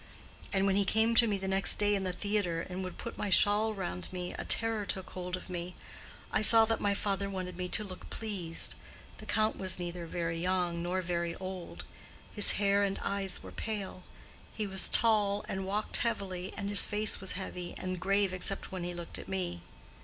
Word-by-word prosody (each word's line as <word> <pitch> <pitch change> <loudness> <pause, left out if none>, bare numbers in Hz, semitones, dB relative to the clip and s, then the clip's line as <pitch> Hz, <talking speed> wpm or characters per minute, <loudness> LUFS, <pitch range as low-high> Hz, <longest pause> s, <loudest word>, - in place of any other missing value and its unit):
And 195 0 +1
when 195 -1 +2
he 200 - +3
came 220 +3 +2
to 230 0 +9
me 205 -2 0
the 190 0 -5
next 190 0 +3
day 205 0 +2
in 200 - 0
the 185 -1 -2
theatre 180 -3 -1
and 185 +2 -5
would 185 - -7
put - - -7
my 205 - -1
shawl 205 +3 +4
around 180 - -4
me, 180 -1 -5
a - - -5
terror 225 -2 +1
took 190 -2 -5
hold 180 0 -4
of - - -11
me; 180 -1 -6 0.6
I - - +1
saw 225 +1 +9
that 225 0 -1
my 200 -1 +1
father 200 -1 -1
wanted 185 -2 -5
me 180 0 -4
to 215 - +2
look 185 -3 -9
pleased. 190 -7 -1 0.5
The - - -11
Count 215 0 +1
was 185 -2 +1
neither 175 -1 -5
very 165 0 -3
young 180 -2 0
nor 180 +2 -2
very 170 -1 -2
old; 185 -2 -7 0.5
his 205 - +5
hair 200 0 +2
and 195 -1 0
eyes 195 -1 -1
were - - -9
pale; 205 -4 -5 0.5
he 215 - -3
was 190 -1 0
tall 210 -3 +3
and 190 0 -4
walked 210 +2 +1
heavily, 190 -6 -3
and 200 - -3
his 205 - +6
face 210 -1 +2
was 190 - +2
heavy 180 -2 -6
and 185 -1 -4
grave 195 +1 +1
except 185 +2 +1
when 185 -2 -5
he 175 0 -4
looked 170 -1 -5
at - - -9
me. 90 -3 -3
190 Hz, 205 wpm, -31 LUFS, 180-205 Hz, 0.6 s, to